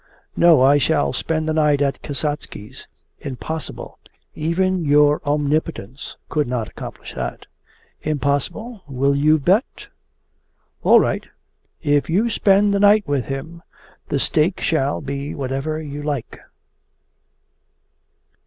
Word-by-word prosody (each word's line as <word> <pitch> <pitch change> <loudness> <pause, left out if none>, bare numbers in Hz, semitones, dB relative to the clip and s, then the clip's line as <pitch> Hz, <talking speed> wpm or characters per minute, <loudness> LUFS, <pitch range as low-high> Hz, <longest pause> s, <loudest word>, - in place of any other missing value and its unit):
'No, 165 -6 +6
I 140 +2 +5
shall 70 - +1
spend 160 -1 -2
the 155 - 0
night 150 -2 +3
at 140 -1 0
Kasatsky's!' 145 -7 -5 0.3
'Impossible! 155 +4 -6 0.3
Even 175 +3 0
your 145 0 +4
omnipotence 145 -4 -2
could 150 -3 0
not 120 -3 -2
accomplish - - -9
that!' 65 -2 -5 0.6
'Impossible? 155 - -2
Will 140 +1 +1
you 155 +2 +4
bet?' 185 - 0 0.9
'All - - +6
right! - - -1 0.6
If 145 -1 +2
you 215 +8 +2
spend 200 0 +3
the 200 - +1
night 205 -1 +5
with 140 -5 0
him, 160 +5 -6 0.5
the 145 - 0
stake 155 +6 +1
shall 145 -4 0
be 140 0 -5
whatever 135 +3 -3
you 145 -2 -6
like. 145 -5 -4
150 Hz, 115 wpm, -21 LUFS, 140-165 Hz, 0.9 s, No